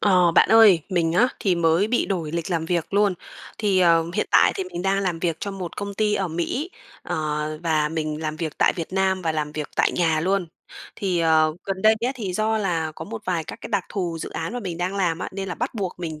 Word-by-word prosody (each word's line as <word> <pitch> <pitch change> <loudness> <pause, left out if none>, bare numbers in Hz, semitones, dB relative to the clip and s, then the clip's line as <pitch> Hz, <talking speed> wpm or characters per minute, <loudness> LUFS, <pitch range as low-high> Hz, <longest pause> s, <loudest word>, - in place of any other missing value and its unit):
Ờ, 180 -4 +4
bạn - - +5
ơi, 220 -6 +7
mình 170 -3 +1
á, 235 +9 +4
thì 190 -3 +2
mới 170 +4 +2
bị 240 - +1
đổi 165 -5 -3
lịch 170 +1 -3
làm 165 -2 -1
việc 175 +2 -2
luôn, 205 -2 +3 0.4
thì, 200 -4 +2
ờ, 165 -2 +4
hiện - - 0
tại - - +5
thì 385 - -3
mình 175 - -6
đang 195 +1 +1
làm 180 -4 -1
việc 165 -1 -1
cho 200 - -3
một 190 -3 -6
công 200 -1 -5
ty 210 0 +1
ở 195 -3 -1
Mỹ, 175 - -3 0.3
ờ, - - -3 0.5
và 155 -3 +1
mình 155 -1 -3
làm 155 0 -3
việc 155 -2 -5
tại - - +4
Việt 165 +1 -5
Nam 190 -1 +1
và 160 -2 0
làm 150 -1 -3
việc 150 -1 -4
tại - - +3
nhà 160 -3 +1
luôn. 190 +2 0 0.5
Thì, 185 -3 -1
ờ, 160 -1 +3
gần 190 -1 -4
đây 220 0 +6
á, 260 - 0
thì 210 -8 -4
do 220 +3 0
là 165 -6 -1
có 160 - -7
một 220 +3 -7
vài 170 -3 -1
các - - -8
cái - - -7
đặc 200 -3 +1
thù 175 -5 -3
dự - - -6
án 165 +7 -4
mà 245 - -4
mình 175 -5 -5
đang 180 +3 -2
làm 175 -4 0
á, - - -4
nên 195 0 -4
là 180 - -3
bắt 245 +2 -3
buộc 195 -4 -3
mình 160 -3 -5
180 Hz, 255 wpm, -23 LUFS, 165-200 Hz, 0.5 s, ơi